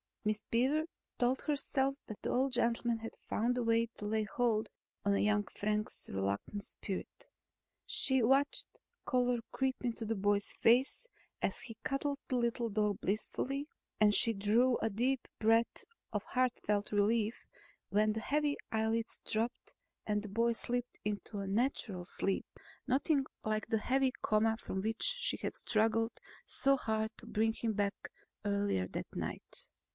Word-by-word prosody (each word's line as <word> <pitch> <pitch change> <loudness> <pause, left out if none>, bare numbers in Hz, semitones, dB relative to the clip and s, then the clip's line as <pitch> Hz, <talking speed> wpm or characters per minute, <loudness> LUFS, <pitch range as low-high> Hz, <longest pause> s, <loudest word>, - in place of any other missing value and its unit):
Miss 215 0 0
Beaver 270 +7 +3 0.3
told 250 +2 +2
herself 275 -2 +1
that 215 - -8
the - - -1
old 260 +1 +1
gentleman 235 -1 +1
had 225 0 -7
found 240 +3 +1
a 245 - +1
way 230 0 +3
to 210 - -6
lay 215 +1 +1
hold 220 +1 +1 0.4
on 200 0 +3
young 210 0 +3
Frank's 210 +1 -2
reluctant 100 - -2
spirit. 195 -1 -6 0.6
She 405 -12 +3
watched 275 +4 +2 0.3
color 250 -2 +2
creep 265 -1 0
into 235 -2 -2
the 225 +1 -1
boy's 205 0 +1
face 255 - +3 0.3
as - - -1
he 225 -2 -7
cuddled 280 +1 -1
the 255 - -1
little 235 -1 0
dog 210 -1 0
blissfully, 270 +7 -2 0.3
and 210 -1 +6
she 230 +2 +8
drew 225 +5 +3
a 225 - +1
deep 250 +5 0
breath 225 +1 +3 0.3
of - - -1
heart 255 -1 +1
felt 205 0 0
relief 215 +2 +2 0.5
when 215 +1 +3
the 220 - -2
heavy 290 +4 +1
eyelids 225 +1 0
drooped 230 +3 -2 0.3
and 210 -1 +1
the 210 - -6
boy 230 +4 +2
slipped 245 +1 -2
off - - -45
into 210 0 -3
a 195 - -3
natural 205 -4 0
sleep, 195 +2 -1 0.4
nothing 275 +2 +2 0.2
like 215 0 -1
the 225 - +1
heavy 265 +3 +2
coma 220 +1 +3
from 190 - -3
which 220 +2 -1 0.2
she - - 0
had - - -4
struggled 225 +1 +1 0.3
so 275 0 +3
hard 220 -3 -1
to - - -12
bring 225 0 +1
him 225 -1 -1
back 205 -1 -2 0.3
earlier 200 - +1
that - - -5
night. - - -5
225 Hz, 155 wpm, -34 LUFS, 210-250 Hz, 0.6 s, she